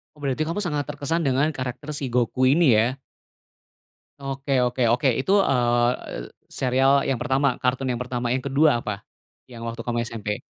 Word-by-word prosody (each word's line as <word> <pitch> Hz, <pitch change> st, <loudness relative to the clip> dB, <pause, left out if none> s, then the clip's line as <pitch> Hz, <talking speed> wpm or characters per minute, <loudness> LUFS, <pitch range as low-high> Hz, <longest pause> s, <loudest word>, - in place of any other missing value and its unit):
Berarti 145 Hz, 0 st, -2 dB
kamu 170 Hz, +6 st, -2 dB
sangat 150 Hz, -6 st, -2 dB
terkesan 150 Hz, +3 st, -2 dB
dengan 135 Hz, +3 st, +2 dB
karakter 130 Hz, 0 st, -6 dB
si 145 Hz, -2 st, -3 dB
Goku 125 Hz, +1 st, +1 dB
ini 135 Hz, -3 st, +5 dB
ya? 115 Hz, +4 st, +2 dB, 1.3 s
Oke 135 Hz, 0 st, -5 dB
oke 125 Hz, +1 st, -2 dB
oke. 125 Hz, +3 st, +1 dB
Itu, 135 Hz, -, -1 dB
eee, 120 Hz, -4 st, 0 dB, 0.2 s
serial 135 Hz, +2 st, +2 dB
yang 135 Hz, -, +1 dB
pertama, 135 Hz, +1 st, +1 dB
kartun 130 Hz, +1 st, -1 dB
yang 125 Hz, -, -1 dB
pertama. 125 Hz, -1 st, -3 dB
Yang 130 Hz, +1 st, -2 dB
ke-2 150 Hz, -2 st, +4 dB
apa 105 Hz, -2 st, -5 dB, 0.5 s
yang 115 Hz, -2 st, -9 dB
waktu 115 Hz, 0 st, -5 dB
kamu 120 Hz, 0 st, -2 dB
SMP? 105 Hz, -3 st, -4 dB
130 Hz, 160 wpm, -24 LUFS, 120-140 Hz, 1.3 s, ini